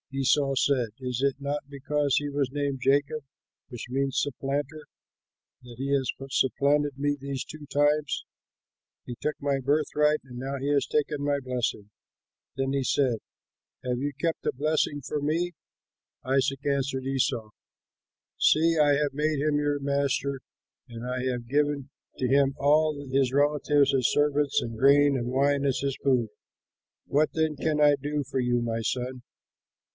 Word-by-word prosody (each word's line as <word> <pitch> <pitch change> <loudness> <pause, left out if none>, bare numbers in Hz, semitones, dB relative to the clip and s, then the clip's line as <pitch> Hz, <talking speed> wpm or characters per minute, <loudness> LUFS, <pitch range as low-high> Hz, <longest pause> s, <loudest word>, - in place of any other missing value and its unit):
Esau 135 +1 +2
said, 130 -3 +2
"Is 125 -1 -3
it 140 0 +1
not 140 0 -4
because 145 0 0
he 145 - 0
was 140 -2 -1
named 140 -1 -2
Jacob, 145 +3 +1 0.5
which 120 - -7
means 135 +1 0
Supplanter, 145 +2 -3 0.8
that 125 -1 -12
he 135 +2 -3
has 135 -2 0 0.2
supplanted 140 +2 +1
me 145 +1 0
these 140 -1 -5
two 155 -1 -10
times: 145 +1 +1 0.8
he 120 - -6
took 150 - -1
my 140 -1 0
birthright, 150 +1 +2
and 125 -2 -10
now 135 +2 -4
he 140 +2 -2
has 140 - +2
taken 150 -1 -1
my 145 0 +1
blessing!" 125 -5 -3 0.7
Then 135 0 -1
he 140 -1 0
said, 125 -3 +1 0.7
"Have 125 -1 -1
you 145 +2 -1
kept 165 0 -2
a - - +2
blessing 145 +1 0
for 145 +3 -3
me?" 165 +4 0 0.7
Isaac 135 +1 0
answered 135 -2 -1
Esau, 130 -5 -1 0.9
"See, 165 +1 +4
I 145 -1 +5
have 145 0 0
made 150 +1 0
him 150 0 +1
your 145 -1 0
master 140 -1 -1 0.5
and 115 0 -7
I 125 0 -3
have 120 -1 -5
given 145 0 0 0.3
to 130 - 0
him 135 +1 +3
all 150 +1 +2
his 135 -1 +2
relatives 145 0 +3
as 130 -3 +2
servants 145 -1 +2
and 115 -1 -5
grain 140 +3 +5
and 120 -2 -2
wine 140 +2 +2
as 135 -2 +1
his 140 -1 -1
food. 125 -4 +2 0.8
What 150 +2 +2
then 160 -1 0
can 150 +1 -1
I 145 -1 +6
do 145 +1 -2
for 135 - -1
you, 120 -1 +1
my 115 -1 -2
son?" 125 +2 -3
140 Hz, 160 wpm, -27 LUFS, 130-145 Hz, 0.9 s, I